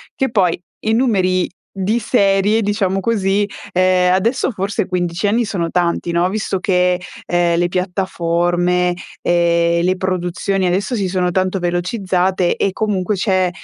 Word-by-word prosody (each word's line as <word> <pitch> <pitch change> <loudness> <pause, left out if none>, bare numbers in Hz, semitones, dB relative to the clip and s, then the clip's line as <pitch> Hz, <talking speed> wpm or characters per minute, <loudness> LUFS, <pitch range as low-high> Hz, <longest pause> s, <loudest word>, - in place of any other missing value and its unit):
Che 265 - 0
poi, 185 -6 +2 0.3
i 220 - +2
numeri 190 -7 +1 0.3
di 205 +5 0
serie 205 -1 +2
diciamo 200 -2 0
così, 205 -2 +1 0.3
ehm, 185 0 +3
adesso 230 +10 +1
forse 200 -2 -2
15 175 0 -1
anni 230 +4 +2
sono 180 -6 -2
tanti, 170 0 -1
no, 175 +1 +2
visto 200 -2 -2
che, 180 -1 +2 0.3
ehm, 175 -1 +1
le 175 - +2
piattaforme, 180 -1 0 0.3
ehm, 170 0 +2
le 185 +1 +2
produzioni 185 +1 -1
adesso 195 +7 0
si 195 -4 -1
sono 180 -1 0
tanto 185 +1 0
velocizzate 180 0 0
e 200 - 0
comunque 205 -1 -1
c'è 185 -2 +1
185 Hz, 140 wpm, -18 LUFS, 175-200 Hz, 0.3 s, ehm